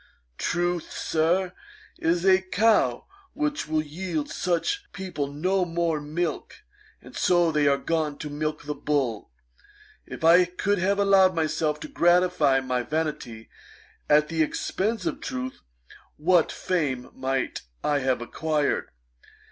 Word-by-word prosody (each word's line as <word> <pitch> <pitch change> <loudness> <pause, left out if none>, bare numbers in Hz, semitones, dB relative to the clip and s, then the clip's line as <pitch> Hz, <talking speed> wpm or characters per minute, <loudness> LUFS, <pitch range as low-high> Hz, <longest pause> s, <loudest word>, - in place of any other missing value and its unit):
Truth, 175 -1 -1
Sir, 175 +3 0 0.5
is 170 +2 +1
a 190 0 +5
cow 215 +4 +2 0.3
which 300 - -2
will 155 0 0
yield 160 0 -4
such 405 - -1
people 180 -7 -4
no 185 +6 0
more 165 -2 -1
milk, 155 +4 -4 0.4
and - - -13
so 175 -2 +3
they 150 -2 +2
are 140 0 +4
gone 155 -2 -1
to 150 - -6
milk 155 +1 -3
the 150 0 -3
bull. 140 -7 -1 0.8
If - - -8
I 170 +3 +7
could 195 +3 -1
have 195 +3 +1
allowed 195 -2 +4
myself 155 -1 0
to - - -5
gratify 175 - +3
my 125 -1 -1
vanity 140 -5 -4 0.6
at 150 0 +5
the 165 0 -1
expence 215 - -1
of 305 -4 -3
truth, 260 0 -5 0.6
what 170 +2 +3
fame 140 -9 -2
might 130 -1 -2 0.2
I 145 -1 +2
have 130 -3 0
acquired. 150 +3 -1
165 Hz, 130 wpm, -25 LUFS, 150-185 Hz, 0.8 s, I